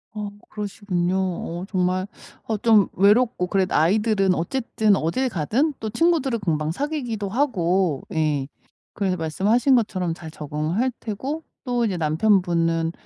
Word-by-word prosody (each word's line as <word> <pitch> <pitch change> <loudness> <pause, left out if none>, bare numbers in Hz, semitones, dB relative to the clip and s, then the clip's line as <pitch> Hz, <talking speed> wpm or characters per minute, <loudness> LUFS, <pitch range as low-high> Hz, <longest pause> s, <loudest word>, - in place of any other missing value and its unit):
어 210 -1 -4 0.2
그러시군요. 200 -4 -2
어 180 -1 -3
정말 185 -1 0 0.4
어 220 - -2
좀 215 -2 +4
외롭고 205 0 +3
그래도 190 0 0
아이들은 195 +3 +3
어쨌든 215 +2 +1
어딜 220 +12 0
가든 240 - 0
또 220 - -3
친구들을 275 -2 +1
금방 155 -5 -1
사귀기도 245 - -3
하고 190 - +1
예 150 -4 0 0.5
그래서 195 -3 0
말씀하신 205 - +2
것처럼 185 -7 0
잘 165 -1 -9
적응할 155 - -2
테고 265 +9 -4 0.2
또 245 -2 0
이제 200 -4 -1
남편분은 165 -1 +1
195 Hz, 300 characters per minute, -23 LUFS, 170-230 Hz, 0.5 s, 좀